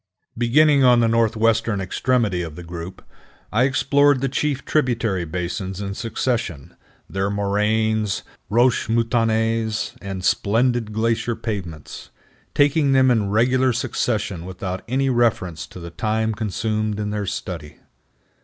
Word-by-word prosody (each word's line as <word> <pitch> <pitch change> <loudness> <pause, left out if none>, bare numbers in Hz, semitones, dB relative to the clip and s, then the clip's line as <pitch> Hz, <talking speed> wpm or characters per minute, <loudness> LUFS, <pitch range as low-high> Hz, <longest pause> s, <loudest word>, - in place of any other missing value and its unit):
Beginning 140 +4 +4
on 125 -1 +6
the 115 - +3
northwestern 115 -1 +2
extremity 100 0 0
of 80 -3 -6
the 90 - -9
group, 85 +1 -8 0.5
I 115 +4 +3
explored 140 +1 +3
the 135 +1 -1
chief 140 +1 -1
tributary 115 - 0
basins 90 +3 -4
in 100 -1 -4
succession, 115 - -3 0.3
their 95 +1 -1
moraines, 105 +1 0 0.3
roches 120 +4 +3
moutonnées, 115 -1 0
and 95 -2 -5
splendid 115 +3 +1
glacier 115 +2 0
pavements, 90 -10 -6 0.5
taking 145 -1 +3
them 130 -1 +5
in 110 -4 +1
regular 130 +5 +3
succession 110 -6 -2
without 95 0 -5
any 135 +2 +1
reference 95 -10 0
to 90 - -11
the 85 -1 -8
time 110 +3 -1
consumed 110 0 -2
in 105 0 -2
their 105 -1 -3
study. 85 -5 -5
110 Hz, 125 wpm, -22 LUFS, 95-120 Hz, 0.5 s, on